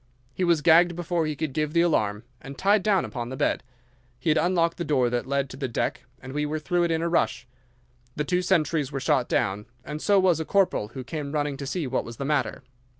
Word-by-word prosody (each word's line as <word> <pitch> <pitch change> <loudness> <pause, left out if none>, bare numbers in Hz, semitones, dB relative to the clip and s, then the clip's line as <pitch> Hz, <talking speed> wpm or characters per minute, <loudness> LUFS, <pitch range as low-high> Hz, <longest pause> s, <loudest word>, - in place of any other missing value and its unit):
He 185 - -2
was 170 -4 +2
gagged 170 +1 +5
before 175 -2 -1
he 155 - -2
could 150 -1 -3
give 150 +1 -1
the 170 - +4
alarm, 105 -11 +1 0.2
and 135 0 -9
tied 200 +1 +3
down 195 -1 +2
upon 120 -3 -5
the 130 - -6
bed. - - +1 0.6
He 160 - 0
had 155 - +2
unlocked 170 0 +1
the 175 - -2
door 130 -7 +1
that 120 +1 -2
led 140 0 0
to 130 - -9
the 135 -1 -2
deck, 115 - -2
and 130 0 -9
we 150 +1 -1
were 150 +1 -2
through 175 +3 0
it - - -1
in 165 0 0
a - - +1
rush. 170 -6 0 0.7
The 150 - -1
two 180 +4 0
sentries 155 -5 +1
were 135 - -3
shot 130 -1 +1
down, 100 +2 0 0.2
and 150 +1 -5
so 200 -1 +4
was 180 -4 +3
a - - -1
corporal 190 - +1
who 130 - -5
came 145 +1 -5
running 145 -2 -1
to 140 0 -6
see 165 +2 -2
what 130 0 -1
was 115 -1 -9
the 135 - -4
matter. 140 -2 -1
150 Hz, 245 wpm, -26 LUFS, 135-170 Hz, 0.7 s, gagged